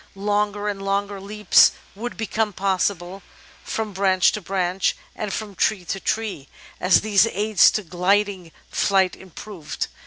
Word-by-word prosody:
Longer 205 +1 -1
and 200 -1 -3
longer 200 0 -2
leaps 210 0 +4 0.2
would 235 +5 -6
become 220 -1 -1
possible, 190 0 -1 0.4
from 220 -2 -4
branch 190 -1 +3
to 215 - -5
branch 185 0 -1 0.2
and 210 -2 -4
from 210 0 -5
tree 190 -1 0
to 195 - -3
tree, 210 -10 -3 0.3
as 180 0 +4
these 210 0 +3
aids 215 -1 +4
to 215 - -2
gliding 185 0 0 0.2
flight 190 -2 +2
improved. 185 -3 -7
200 Hz, 135 wpm, -22 LUFS, 185-210 Hz, 0.4 s, leaps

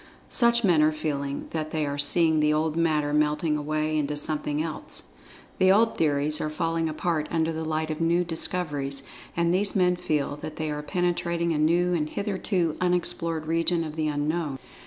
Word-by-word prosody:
Such 235 -1 +3
men 175 -6 +4
are 155 +1 +4
feeling 145 -2 -3
that 155 -1 -3
they 155 -1 -1
are 145 0 -3
seeing 160 +2 +4
the 150 0 +3
old 155 0 0
Matter 155 -3 +1
melting 150 +1 +1
away 155 +1 -1
into 150 -1 -1
something 150 0 -1
else—the 165 +3 -3
old 225 +3 +3
theories 150 -1 +1
are 155 - -1
falling 165 +1 -1
apart 155 0 -1
under 165 -1 0
the 160 0 -4
light 155 0 -2
of 155 - -4
new 170 +2 +2
discoveries—and 165 -1 -1
these 200 +2 +1
men 180 -2 +3
feel 150 -5 -2
that 155 +1 -7
they 155 -1 -3
are 150 0 -3
penetrating 170 0 -1
a 150 - -1
new 175 +3 +2
and 155 -3 -1
hitherto 190 -4 -1
unexplored 175 -3 0
region 165 +1 +1
of 155 -1 -6
the 155 -1 -1
Unknown. 150 0 -1
160 Hz, 175 wpm, -26 LUFS, 150-170 Hz, -, men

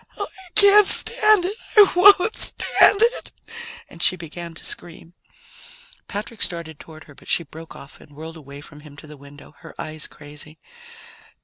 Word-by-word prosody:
Oh, 405 - -4
I 380 -2 -14
can't 410 0 +7
stand 425 -4 +2
it! 395 +3 -3 0.2
I 410 -2 +7
won't 400 +3 +5
stand 415 +2 +2
it!" 475 +2 -1 0.6
And 165 - -14
she 185 - +1
began 170 0 -10
to - - -13
scream. 170 0 -7 0.9
Patrick 215 +2 -8
started 165 -3 -5
toward 155 -1 -14
her, 150 - -18
but - - -18
she 170 - 0
broke 160 +1 -13
off 140 - -15
and 145 - -19
whirled 160 +2 -10
away 140 -2 -13
from 145 0 -14
him 150 -1 -16
to - - -12
the 150 0 -13
window, 140 +1 -17
her - - -14
eyes 155 0 -5
crazy. 150 +1 -10
165 Hz, 175 wpm, -21 LUFS, -, 0.9 s, can't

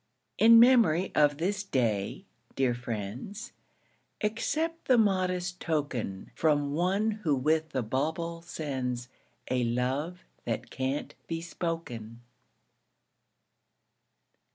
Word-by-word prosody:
In 230 +3 +9
memory 230 -8 +5
of 145 -1 +4
this 190 +5 -1
Day, 115 - -1 0.3
dear 130 -2 +2
friends, 120 - -5 0.7
Accept 310 +10 -1
the 255 - +5
modest 185 -4 +1
token 140 - -2
From 145 -3 +1
one 190 +7 +1
who 150 -4 +3
with 155 +4 +1
the 130 -4 -1
bauble 160 +8 -2
sends 130 -7 -4 0.4
A 125 -1 +2
love 130 +9 -1 0.2
that 115 -2 -3
can't 135 +2 -2
be 165 -1 -2
spoken. 165 -10 -5
155 Hz, 100 wpm, -29 LUFS, 125-185 Hz, 0.7 s, In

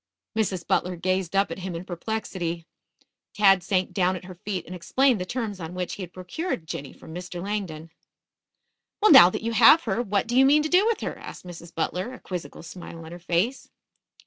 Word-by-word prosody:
Mrs. 190 -5 -1
Butler 180 0 0
gazed 185 +1 -1
up 195 +1 +2
at - - -5
him 185 -1 -5
in 170 +2 -6
perplexity. 175 -3 -4 0.7
Tad 195 -2 +5
sank 185 +1 0
down 185 0 +2
at 185 - -8
her 185 - -9
feet 185 +1 -5
and 180 - -9
explained 245 +5 +2
the 180 - -4
terms 220 -5 -3
on 165 +1 -7
which 180 -1 -3
he - - -7
had 180 -2 -7
procured 185 - -4
Jinny 140 -2 -6
from 160 - -13
Mr. 180 0 -6
Langdon. 175 -5 -4 1.1
"Well, 430 - +5
now 265 - +10
that 185 - -5
you 230 - -1
have 235 +8 +7
her, 220 +1 -1
what 205 -4 0
do 240 +1 -3
you 260 - +7
mean 295 +3 +5
to 310 - -2
do 370 +6 +4
with 460 - 0
her?" - - -3
asked - - -10
Mrs. 170 -1 -10
Butler, 185 +8 -2
a 255 - -10
quizzical 175 -6 -7
smile 170 0 -9
on 160 - -10
her 175 - -8
face. 180 +10 -1
185 Hz, 210 wpm, -25 LUFS, 175-220 Hz, 1.1 s, now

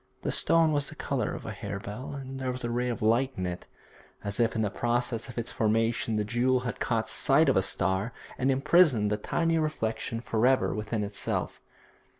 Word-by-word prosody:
The - - 0
stone 165 -1 +3
was 145 -1 +1
the - - -10
colour - - -2
of - - -8
a - - -4
harebell, 105 +7 -6
and 135 -1 -7
there 130 -1 -1
was 125 0 -4
a 120 - -2
ray 125 +1 0
of 115 -3 -3
light 120 +5 +2
in 90 - -2
it, 90 0 -5 0.6
as 100 +2 -3
if 115 -1 +2
in 110 - +1
the 105 - -1
process 120 +1 -1
of 120 - -10
its 120 0 -3
formation 115 +1 +1
the 105 - +1
jewel 125 +3 +1
had 125 -3 -4
caught - - 0
sight - - +3
of - - +3
a - - +4
star, 95 +5 0 0.2
and 130 +1 0
imprisoned 135 - +4
the 105 - +1
tiny 165 +9 0
reflection 115 -7 -2
for 115 0 +1
ever 130 0 +2
within 105 0 -2
itself. 100 0 -3
120 Hz, 205 wpm, -28 LUFS, 110-130 Hz, 0.6 s, a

